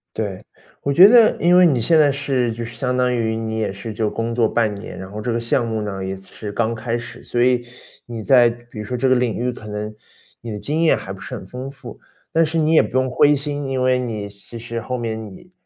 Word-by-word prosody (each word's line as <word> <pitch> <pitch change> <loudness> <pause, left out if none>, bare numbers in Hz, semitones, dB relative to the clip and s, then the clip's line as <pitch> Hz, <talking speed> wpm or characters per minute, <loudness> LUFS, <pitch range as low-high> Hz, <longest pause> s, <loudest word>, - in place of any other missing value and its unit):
对， 100 -4 -4 0.4
我 140 - 0
觉 185 +7 +9
得 230 -1 +6
因 175 +1 +5
为 180 - +7
你 135 -7 +3
现 160 +6 +4
在 145 -2 +5
是 135 -4 -1
就 115 +1 -5
是 115 0 -8
相 125 -2 -1
当 125 0 +2
于 110 -1 0
你 110 0 -3
也 110 -3 -1
是 100 +3 -7
就 105 0 -1
工 115 +1 -3
作 115 -2 +2
半 110 -3 +1
年， 100 0 -9
然 95 +1 -8
后 105 - -6
这 120 +3 -2
个 115 - 0
项 115 +1 0
目 110 -1 -2
呢， 95 -2 -4
也 95 0 -3
是 100 +2 -9
刚 115 +2 0
开 115 +1 -3
始， 120 0 -7
所 120 0 0
以 125 -1 +2 0.4
你 115 -2 -6
在 120 +1 +5
比 120 -1 -7
如 105 - -4
说 125 - -4
这 130 +2 +1
个 130 - +5
领 125 -2 0
域， 125 +1 -1
可 110 -3 -11
能 105 +1 -5 0.5
你 115 - -6
的 105 - -5
经 155 +7 -1
验 160 - +5
还 95 - -7
不 95 - -8
是 - - -8
很 - - -8
丰 125 +6 -7
富。 135 - -11 0.3
但 165 +1 +3
是 160 +1 -2
你 155 +1 +2
也 - - +7
不 - - -4
用 130 0 +1
灰 145 +3 +4
心， 145 0 -3
因 130 -1 -1
为 130 0 +3
你 110 -5 -4
其 100 +3 -11
实 115 0 -5
后 125 +2 -3
面 110 -2 -4
你， 180 - -17
120 Hz, 285 characters per minute, -20 LUFS, 110-135 Hz, 0.5 s, 觉